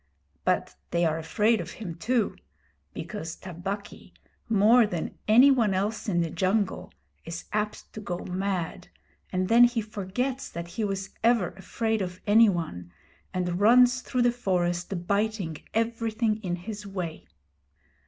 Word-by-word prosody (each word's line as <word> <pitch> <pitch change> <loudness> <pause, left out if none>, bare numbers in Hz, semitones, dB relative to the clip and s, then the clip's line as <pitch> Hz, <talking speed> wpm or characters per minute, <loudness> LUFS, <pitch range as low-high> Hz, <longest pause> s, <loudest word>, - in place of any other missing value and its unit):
But - - 0
they 170 0 +1
are 160 0 +1
afraid 215 +7 +2
of - - -8
him 190 -7 -6
too, 225 +6 0 0.6
because 165 -1 -6
Tabaqui, 190 +3 -7 0.3
more 225 +2 +5
than 175 -5 -4
any 245 +6 +7
one 225 -7 +2
else 210 +3 -1
in 175 -3 +2
the 165 -2 -2
jungle, 195 +1 0 0.3
is 165 0 -6
apt 210 0 -3
to - - -6
go 175 -4 -3
mad, 185 -2 -3 0.4
and 185 0 0
then 235 +4 +7
he 240 -1 0
forgets 220 +5 -3
that 170 0 -6
he 220 +5 -3
was 195 -1 -3
ever 230 -6 +3
afraid 220 +3 -2
of 180 -1 -4
any 220 +2 +6
one, 155 - -4 0.4
and 180 -1 -1
runs 245 +4 +6
through 250 -1 0
the 240 - +4
forest 180 -6 -1
biting 200 -5 0 0.2
everything 225 -1 0
in 180 -5 -3
his 205 +4 -7
way. 180 -5 -5
200 Hz, 145 wpm, -27 LUFS, 175-225 Hz, 0.6 s, any